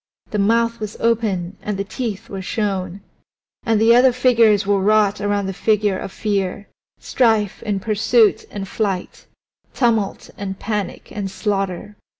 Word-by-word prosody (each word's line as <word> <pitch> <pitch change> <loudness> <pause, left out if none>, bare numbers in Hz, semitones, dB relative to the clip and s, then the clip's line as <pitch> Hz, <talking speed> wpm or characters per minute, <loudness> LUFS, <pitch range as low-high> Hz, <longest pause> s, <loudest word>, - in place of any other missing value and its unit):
The 210 - -1
mouth 230 +3 +2
was 215 -1 -6
open 205 -6 0
and 210 -2 -3
the 200 - -1
teeth 215 -1 -5
were 195 -1 -6
shown. 190 -2 -3 0.6
And 225 -4 +1
other 240 +3 +6
figures 230 -5 +3
were 200 -1 +2
wrought 210 0 +3
around 205 -1 0
the 190 - -3
figure 205 -1 +1
of - - -6
Fear 200 -2 -2 0.3
Strife 220 -5 +1
and 200 -2 0
Pursuit 220 +1 +3
and 195 -1 -6
Flight; 195 -3 -3 0.5
Tumult 225 -5 0
and 195 -1 -4
Panic 205 -3 -4
and 200 -2 -4
Slaughter. 195 +1 -3
205 Hz, 145 wpm, -20 LUFS, 195-225 Hz, 0.6 s, other